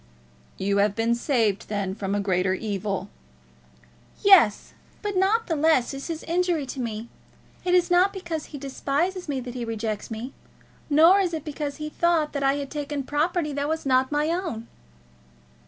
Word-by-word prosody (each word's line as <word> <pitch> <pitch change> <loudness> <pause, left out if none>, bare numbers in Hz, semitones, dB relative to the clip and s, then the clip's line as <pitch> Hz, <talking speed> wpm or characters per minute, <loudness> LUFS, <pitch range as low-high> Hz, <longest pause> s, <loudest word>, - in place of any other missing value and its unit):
"You 200 +1 0
have 200 0 +2
been 230 +1 +1
saved, 235 -5 0
then, 200 -3 -2
from 200 -1 -3
a - - +1
greater 185 -1 +1
evil." 200 -1 -3 1.1
"Yes; 365 - +5 0.3
but 410 -1 -2
not 410 +5 +2
the 325 - -1
less 295 -4 +2
is 275 0 -6
his 330 -2 -5
injury 345 -3 0
to 270 - -8
me. 225 -2 -4 0.6
It 360 0 +2
is 355 -1 +3
not 365 +3 +5
because 340 -5 -5
he 295 - -9
despises 290 +6 -2
me 275 -2 -1
that 245 -1 -7
he 250 -1 -4
rejects 220 -2 -3
me; 230 +4 -6 0.6
nor 325 +6 +6
is 355 -4 0
it 310 -1 -6
because 295 -1 -4
he 305 -1 -5
thought 325 -1 +1
that 280 - -2
I 275 0 +3
had 280 -1 -5
taken 290 -1 -3
property 300 +2 0
that 285 +1 -2
was 320 -1 -2
not 260 0 +2
my 295 +1 +1
own." 330 -10 -3
285 Hz, 175 wpm, -25 LUFS, 225-335 Hz, 1.1 s, nor